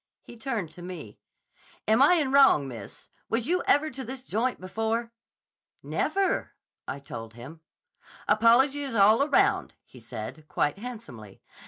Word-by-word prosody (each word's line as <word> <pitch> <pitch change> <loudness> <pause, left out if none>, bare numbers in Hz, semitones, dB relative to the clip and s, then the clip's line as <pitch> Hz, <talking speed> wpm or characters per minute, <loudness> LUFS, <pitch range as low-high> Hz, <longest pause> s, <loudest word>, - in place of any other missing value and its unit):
He - - -12
turned 225 - -4
to 175 - -13
me. 175 - -9 0.7
'Am 220 +4 +4
I 295 +6 +7
in 290 -6 +1
wrong, 270 - +5
miss? 115 -6 -10 0.2
Was 230 0 0
you 350 +4 +1
ever 305 +2 +3
to 265 +1 -7
this 260 +1 -7
joint 250 +1 -1
before?' 225 +5 -2 0.7
'Never,' 390 0 -1 0.3
I - - -4
told 115 -5 -9
him. 140 +7 -11 0.7
'Apologies 260 +5 +3
all 220 +8 +5
round,' 390 +6 +2
he 125 - -15
said, 120 +6 -8
quite 150 +4 -1
handsomely. 210 - -10
225 Hz, 140 wpm, -27 LUFS, -, 0.7 s, I